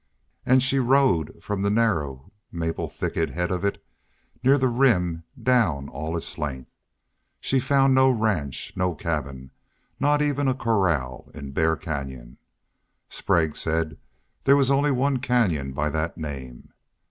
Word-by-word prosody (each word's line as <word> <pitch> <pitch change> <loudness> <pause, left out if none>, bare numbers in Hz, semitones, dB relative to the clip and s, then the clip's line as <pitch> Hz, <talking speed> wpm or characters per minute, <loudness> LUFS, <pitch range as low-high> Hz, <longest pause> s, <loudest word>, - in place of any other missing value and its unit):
And 130 0 +5
she 135 0 +2
rode 130 - +2
from 100 -2 -3
the 100 - +1
narrow, 80 - 0 0.2
maple 80 -1 -3
thicketed - - -2
head 90 +1 -1
of 90 0 -2
it 100 - -2 0.6
near 135 +2 +5
the 130 -2 +2
Rim 95 -10 +2
down 95 - +2
all 80 +5 -4
its 80 - -5
length. 65 -4 -5 0.7
She 135 - +1
found 135 +1 +3
no 130 0 +5
ranch, 105 - -1
no 90 -2 0
cabin, 70 -5 -4 0.5
not 145 +1 +3
even 145 -1 0
a 130 - +2
corral 90 - 0
in 70 -3 -7
Bear 80 +3 +2
Canyon. 65 -6 -6 0.7
Sprague 80 -3 0
said 80 -2 -2 0.5
there 140 - +6
was 135 -1 +3
only 140 +2 +3
one 135 0 +1
canyon 105 - +1
by 75 +3 -1
that 80 +2 -2
name. 65 -6 -8
90 Hz, 145 wpm, -24 LUFS, -, 0.7 s, there